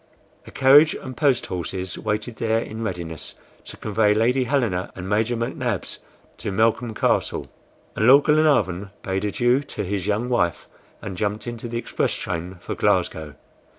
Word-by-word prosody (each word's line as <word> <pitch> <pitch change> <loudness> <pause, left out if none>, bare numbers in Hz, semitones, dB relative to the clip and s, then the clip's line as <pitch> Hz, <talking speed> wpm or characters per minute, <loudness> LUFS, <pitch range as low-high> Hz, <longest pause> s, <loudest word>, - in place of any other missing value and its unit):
A - - -10
carriage 145 +4 +6
and 130 - -8
post 140 -5 +2
horses 90 +1 -4
waited 110 +2 -3
there, 110 -1 +1
in 110 -1 -6
readiness 85 -6 -5 0.3
to - - -9
convey 105 0 +2
Lady 125 +4 +2
Helena 115 -9 0
and 95 -1 -6
Major 110 +4 +1
McNabbs 115 -3 -3 0.4
to 110 -1 -4
Malcolm 115 +2 +1
Castle, - - 0 0.5
and 110 - +2
Lord 140 +3 +8
Glenarvan 120 - +2
bade 95 +1 -2
adieu 120 +5 +2
to 110 -7 -5
his 100 0 -3
young 105 +4 0
wife, 90 -10 0 0.4
and 95 -3 -5
jumped 105 +3 -2
into 120 0 -5
the 115 0 -4
express 120 - -1
train 85 +2 -4
for - - -5
Glasgow. 75 -2 0
110 Hz, 155 wpm, -23 LUFS, 95-120 Hz, 0.5 s, Lord